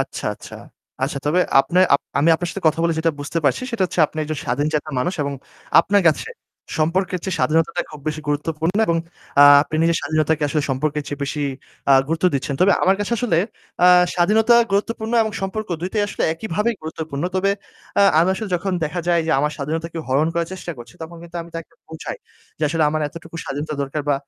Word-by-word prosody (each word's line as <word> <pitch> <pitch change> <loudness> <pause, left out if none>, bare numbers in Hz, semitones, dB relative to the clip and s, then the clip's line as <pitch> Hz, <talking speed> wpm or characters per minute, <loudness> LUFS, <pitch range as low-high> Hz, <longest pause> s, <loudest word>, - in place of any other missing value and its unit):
আচ্ছা, - - -4
আচ্ছা। - - -11 0.5
আচ্ছা 140 +1 -1
তবে 165 +5 +3 0.2
আপনা 180 +6 -1 0.2
আপ - - +3 0.2
আমি 150 +4 +3
আপনার 175 +2 -2
সাথে 195 - -7
কথা 160 +1 +3
বলে 170 -1 +2
যেটা 165 +1 +2
বুঝতে 145 +3 -2
পারছি, 135 - +2
সেটা 230 -5 -1
হচ্ছে 180 - -2
আপনি 155 - -10
একজন 155 -1 -4
স্বাধীনচেতা 150 +4 -1
মানুষ 175 +9 -1
এবং 140 0 -3 0.5
আপনার 200 0 +2
কাছে 160 - 0 0.5
সম্পর্কের 180 +4 0
চেয়ে 190 -2 -2
স্বাধীনতাটা 165 +2 +1
খুব 150 - -10
বেশি 155 0 -4
গুরুত্বপূর্ণ। 160 +4 -1
এবং 170 - +2 0.4
আ - - +10 0.2
আপনি 155 - -8
নিজের 165 0 +3
স্বাধীনতাকে 155 +1 0
আসলে 150 +1 0
সম্পর্কের 150 +3 -1
চেয়ে 145 0 -6
বেশি 145 +1 -3 0.5
আ - - +8 0.2
গুরুত্ব 165 +2 -1
দিচ্ছেন। 140 +1 -2
তবে 190 +2 +5
আমার 190 +1 +4
কাছে 205 +3 -2
আসলে 215 -9 +1 0.5
আ - - +8 0.3
স্বাধীনতা 215 +6 +4 0.2
গুরুত্বপূর্ণ 220 +3 -1
এবং 220 -1 -3
সম্পর্ক, 215 +3 -3
২টাই 190 +4 -1
আসলে - - -4
একইভাবেই 210 +6 -1
গুরুত্বপূর্ণ। 160 -2 -5
তবে 190 +1 +2 0.5
আ 200 - +6 0.2
আমি 170 +3 +4
আসলে 210 +2 -5
যখন 190 +2 -1
দেখা 155 +3 -3
যায় 170 -1 +3
যে - - 0
আমার 150 +1 0
স্বাধীনতাকে 160 +3 -4
হরণ 140 +5 +2
করার 170 -1 -1
চেষ্টা 180 -2 -6
করছে, 120 0 -12
তখন 170 +1 -8
কিন্তু 170 0 -9
আমি 170 - -14
তাকে 165 - -8 0.2
বোঝাই 160 0 -6 0.4
যে - - -8
আসলে 160 +1 0
আমার 155 +1 -1
এতটুকু 165 +2 -10
স্বাধীনতা 150 +2 -4
দরকার 140 +2 -3
বা 145 - +4
165 Hz, 200 wpm, -21 LUFS, 150-185 Hz, 0.5 s, আ